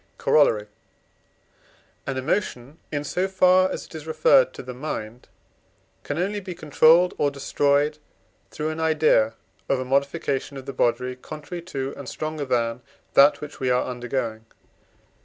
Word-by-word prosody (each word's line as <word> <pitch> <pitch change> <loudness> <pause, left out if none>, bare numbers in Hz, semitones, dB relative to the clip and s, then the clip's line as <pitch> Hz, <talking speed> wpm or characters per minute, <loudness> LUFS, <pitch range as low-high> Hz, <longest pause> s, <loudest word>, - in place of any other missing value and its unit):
Corollary. 115 -9 +3 1.4
An 130 - -2
emotion, 135 -1 -2
in 145 -1 -2
so 180 +6 -1
far 185 0 +4
as - - -5
it - - -17
is 160 -1 -8
referred 160 - +4
to - - -8
the 125 0 -7
mind, 125 -4 -6 0.7
can 145 - -4
only 200 +4 -1
be 185 -3 -7
controlled 165 +2 +4
or 145 - +3
destroyed 145 +2 +1 0.5
through 155 0 -3
an 155 0 -5
idea 155 -9 +3 0.3
of 135 - +2
a 130 - -3
modification 140 +1 -1
of 135 - -9
the 135 - -6
body 125 +1 0
contrary 155 +6 -8
to, 135 -6 -5
and 140 -3 -8
stronger 155 -1 -4
than, 120 -2 0 0.3
that 140 +2 +6
which 150 0 -8
we 130 -2 0
are 125 0 +2
undergoing. 120 -3 -4
145 Hz, 150 wpm, -24 LUFS, 125-160 Hz, 1.4 s, that